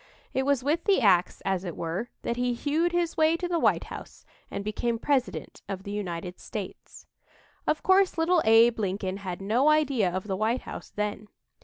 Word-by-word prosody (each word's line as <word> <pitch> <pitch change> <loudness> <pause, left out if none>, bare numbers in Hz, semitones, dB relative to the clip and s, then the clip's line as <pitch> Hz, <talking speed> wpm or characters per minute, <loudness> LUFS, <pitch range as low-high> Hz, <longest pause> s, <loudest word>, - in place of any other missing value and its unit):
It 265 +1 0
was 280 -3 +2
with 310 +5 0
the 400 -2 +4
ax, 190 -6 +3
as 190 -1 0
it 175 -4 -6
were, 175 +8 -3
that 235 - -1
he 245 0 0
hewed 310 +7 0
his 345 -1 0
way 315 +1 +4
to 355 - -3
the 345 -1 0
White - - +3
House - - -10 0.2
and 200 - -4
became 230 +2 -1
President 260 +1 -1
of 190 -1 -4
the 200 - -6
United 180 -3 -4
States. 205 -4 -8 0.6
Of 305 - +1
course, 380 -1 +4
little 330 +1 +3
Abe 225 +1 +5
Lincoln 195 -1 -2
had 190 -1 -6
no 240 +9 +3
idea 280 -10 +3
of 185 +1 -3
the 195 -2 -2
White 220 +5 0
House - - -8
then. 210 0 -3
230 Hz, 190 wpm, -27 LUFS, 195-305 Hz, 0.6 s, Abe